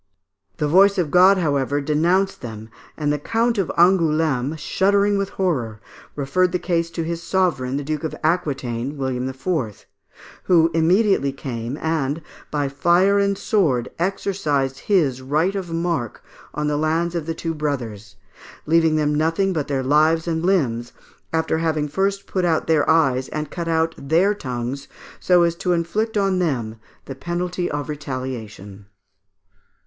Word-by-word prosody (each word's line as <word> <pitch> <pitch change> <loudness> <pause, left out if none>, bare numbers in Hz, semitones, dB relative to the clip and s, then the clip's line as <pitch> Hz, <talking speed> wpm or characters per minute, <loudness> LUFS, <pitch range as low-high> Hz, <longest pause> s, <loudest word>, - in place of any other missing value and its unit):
The 150 - 0
voice 195 +6 +5
of 165 -6 0
God, 185 +2 +6
however, 145 -4 0
denounced 170 +7 +1
them, 110 -2 -8 0.3
and 150 -1 0
the 150 - -2
Count 230 - 0
of 190 - 0
Angoulême, 160 -5 +2
shuddering 200 +6 +2
with 195 -1 -1
horror, 125 - -2 0.4
referred 150 +6 +1
the - - +2
case 170 -2 -1
to 165 0 -4
his 170 +1 -4
sovereign, 165 -9 0
the 145 - -3
Duke 155 +1 -3
of 160 - -3
Aquitaine, 140 -5 -1
William 130 -1 -2
IV., 130 - -3 0.6
who 165 -2 +4
immediately 170 -2 +3
came, 125 -1 -5
and 160 -1 -2 0.3
by 145 -2 -1
fire 175 +8 +3
and 200 0 +1
sword 140 - +1
exercised 155 -8 -1
his 150 -11 +1
right 155 +8 0
of 190 -4 -4
marque 165 -8 -2 0.3
on 150 +1 -2
the 150 0 0
lands 165 +3 0
of 165 -3 -3
the 165 - -2
two 165 -1 -3
brothers, 120 -9 -4 0.5
leaving 160 0 +3
them 150 -1 +1
nothing 165 +6 +1
but 155 -4 -2
their 135 -2 -1
lives 155 +4 +3
and 165 -1 -1
limbs, 125 -11 0 0.4
after 160 0 0
having 155 -2 0
first 195 +6 -1
put 185 - -2
out 165 -3 +1
their 155 -3 +2
eyes 135 -5 +3
and 150 -1 -5
cut 170 -2 -4
out 165 0 +1
their 170 +9 +2
tongues, 130 -4 -5 0.3
so 180 -1 +4
as 170 -1 +2
to 180 +1 -1
inflict 210 +7 -1
on 195 -2 +1
them 120 -10 -1 0.3
the 135 - -6
penalty 175 +5 -3
of 145 -2 -3
retaliation. 125 -9 -6
160 Hz, 155 wpm, -21 LUFS, 135-180 Hz, 0.6 s, God